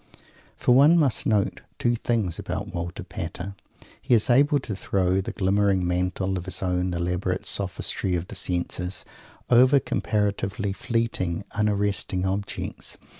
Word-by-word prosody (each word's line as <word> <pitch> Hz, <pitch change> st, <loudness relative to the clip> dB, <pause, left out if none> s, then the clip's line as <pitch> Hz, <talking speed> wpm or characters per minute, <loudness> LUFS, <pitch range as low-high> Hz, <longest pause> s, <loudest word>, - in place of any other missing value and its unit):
For 125 Hz, -, +3 dB
one 145 Hz, +6 st, +7 dB
must 145 Hz, -7 st, +2 dB
note 105 Hz, -3 st, +1 dB, 0.2 s
two 120 Hz, -, +2 dB
things 110 Hz, -7 st, -1 dB
about -, -, -4 dB
Walter 85 Hz, +3 st, -4 dB
Pater. 90 Hz, +1 st, -6 dB, 0.5 s
He 120 Hz, -, +3 dB
is 110 Hz, +2 st, +3 dB
able 145 Hz, +4 st, +5 dB
to 125 Hz, -7 st, -4 dB
throw 95 Hz, -1 st, +1 dB
the -, -, -5 dB
glimmering 100 Hz, -1 st, +2 dB
mantle 90 Hz, +2 st, 0 dB
of 85 Hz, -, -8 dB
his 90 Hz, +1 st, -3 dB
own 90 Hz, -1 st, 0 dB
elaborate 90 Hz, +2 st, -1 dB
sophistry 95 Hz, -1 st, -1 dB
of 85 Hz, +1 st, -3 dB
the -, -, -9 dB
senses 90 Hz, +1 st, -2 dB, 0.5 s
over 130 Hz, +3 st, +6 dB
comparatively 100 Hz, -4 st, -1 dB
fleeting, 105 Hz, -6 st, -1 dB
unarresting 100 Hz, -2 st, 0 dB
objects. 100 Hz, +1 st, -3 dB
95 Hz, 135 wpm, -25 LUFS, 90-110 Hz, 0.5 s, one